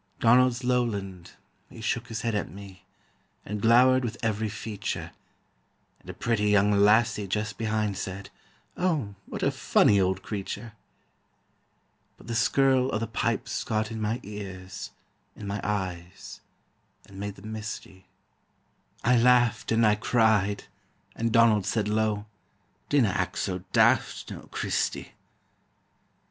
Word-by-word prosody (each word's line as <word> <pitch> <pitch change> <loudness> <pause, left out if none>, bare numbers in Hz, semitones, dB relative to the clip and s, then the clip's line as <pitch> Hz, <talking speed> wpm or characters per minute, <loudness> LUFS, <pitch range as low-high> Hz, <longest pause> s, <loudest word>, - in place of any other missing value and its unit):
Donald's 125 +1 +4
lowland, 100 -8 -2 0.4
he - - -12
shook 115 +1 -2
his 115 -1 -4
head 115 -1 -1
at 105 - -2
me, 95 -2 -12 0.6
And 105 0 -4
glowered 125 +3 +5
with 115 -1 -3
every 110 -1 0
feature, 105 0 -5 0.9
And - - -16
a - - -5
pretty 115 -3 0
young 105 0 +4
lassie 105 +1 +3
just 105 +3 -3
behind 110 -3 -1
Said: 95 +2 -6 0.4
"Oh, 155 - -1
what - - -5
a - - +3
funny 100 -1 +3
old 95 +1 0
creature!" 105 +3 -5 1.4
But - - -16
the 115 - -4
skirl 130 +2 +3
o' - - 0
the 115 - -2
pipes 115 0 -2
got 110 0 -1
in 110 -1 -5
my 110 +3 -1
ears, 95 -3 -7 0.5
In 105 - -9
my 100 +1 -3
eyes, 90 -4 -4 0.6
and 95 0 -12
made 100 -1 -5
them 105 +3 -9
misty; 105 -3 -7 1.0
I 125 +2 +4
laughed 120 -2 +3
and 115 0 +4
I 105 - +5
cried, 105 -2 +2 0.5
and 115 0 -1
Donald 110 -4 +4
said 110 -3 0
low: 105 -1 0 0.6
"Dinna 135 -7 +3
act - - -2
so 90 -1 -2
daft, - - +2
noo, - - -9
Christy!" - - -2
110 Hz, 135 wpm, -27 LUFS, 100-115 Hz, 1.4 s, glowered